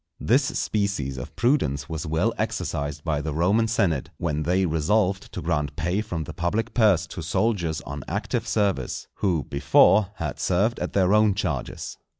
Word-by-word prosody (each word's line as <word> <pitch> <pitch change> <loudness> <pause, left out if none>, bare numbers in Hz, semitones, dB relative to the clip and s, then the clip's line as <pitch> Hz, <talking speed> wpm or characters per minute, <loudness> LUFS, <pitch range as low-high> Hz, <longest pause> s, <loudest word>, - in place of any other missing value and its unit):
This - - +3 0.2
species 95 - -1
of - - -8
prudence 75 - +1
was 80 0 -4
well 85 +9 +1
exercised 75 +1 -2
by 75 -4 -1
the 75 -1 -4
Roman 100 +7 +3
senate 85 - 0
when 75 -4 -1
they 90 +4 +1
resolved 95 +5 +1
to - - -6
grant 75 -3 -1
pay 85 +6 0
from 90 -7 -4
the 85 - -8
public 105 +7 -1
purse 100 -8 +4
to 85 - -7
soldiers 85 -1 0
on 70 -1 -7
active - - -2
service, 100 - -1
who, 85 -7 +1
before, 95 - +4
had 75 -7 -4
served 100 +6 +1
at - - -3
their 95 0 +3
own 105 -2 +4
charges. 80 - -4
85 Hz, 165 wpm, -25 LUFS, 75-105 Hz, 0.2 s, purse